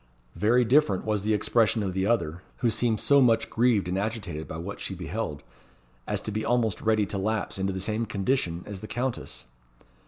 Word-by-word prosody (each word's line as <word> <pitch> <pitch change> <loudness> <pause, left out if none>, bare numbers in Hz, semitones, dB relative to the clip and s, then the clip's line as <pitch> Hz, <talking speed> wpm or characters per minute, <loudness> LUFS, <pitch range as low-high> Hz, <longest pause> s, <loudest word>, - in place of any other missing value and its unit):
Very 120 +4 +3
different 120 -7 +3
was 105 -2 0
the 110 +2 +1
expression 110 +1 +2
of 95 -2 -2
the 95 +1 0
other, 90 -7 0 0.2
who 115 - +4
seemed 110 0 0
so 140 -1 +5
much 115 -3 +3
grieved 115 -5 +2
and 90 +2 -1
agitated 100 -7 -4
by 80 - -6
what 90 +4 -6
she 95 - -4
beheld, 85 -4 -4 0.6
as - - 0
to 110 - -4
be 110 +1 -2
almost 115 -4 +1
ready 110 -2 +2
to 100 0 -4
lapse 105 0 -2
into 95 0 0
the 95 - -4
same 110 +4 -2
condition 95 -5 -1
as 100 -2 -7
the 110 - -8
Countess. 125 +2 -3
105 Hz, 195 wpm, -27 LUFS, 95-115 Hz, 0.6 s, so